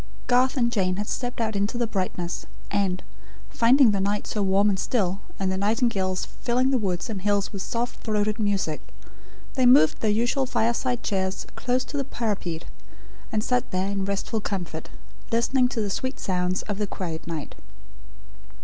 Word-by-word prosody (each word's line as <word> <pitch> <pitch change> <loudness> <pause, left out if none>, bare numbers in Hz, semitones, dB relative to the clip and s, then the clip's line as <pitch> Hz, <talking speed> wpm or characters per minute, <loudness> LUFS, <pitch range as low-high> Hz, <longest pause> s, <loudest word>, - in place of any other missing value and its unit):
Garth 255 +2 +3
and 235 -2 +2
Jane 185 -5 +1
had 210 +2 -2
stepped 245 -1 -3
out 220 -2 0
into 200 +4 0
the 240 - +1
brightness; 185 -4 -3 0.2
and, 195 -3 0 0.5
finding 245 +1 +6
the 200 - 0
night 205 +1 0
so 210 - -2
warm 195 +1 +3
and 195 -2 +2
still, 195 -6 0 0.2
and 190 -1 0
the 190 - -1
nightingales 200 -3 +1
filling 255 +2 0
the 260 - +3
woods 185 -5 -1
and 210 -5 -4
hills 205 +1 +1
with 195 - -4
soft 240 +4 -3
throated 215 0 0
music, 200 -7 0 0.7
they 260 -3 +4
moved 245 - +6
their 220 - +2
usual 240 +5 +2
fireside 240 +1 0
chairs 190 -1 -1
close 250 +1 0
to 290 - -5
the 275 - +1
parapet, 205 -10 -3 0.7
and 215 -2 0
sat 250 0 +1
there 185 +1 0
in 195 -1 -1
restful 200 +3 -1
comfort, 175 -6 -4 0.4
listening 250 +2 +3
to 245 -3 -2
the 205 -2 -1
sweet 260 +6 -2
sounds 180 -1 0
of 205 -1 -4
the 210 - 0
quiet 165 -5 -5
night. 160 -3 -4
210 Hz, 175 wpm, -25 LUFS, 190-240 Hz, 0.7 s, finding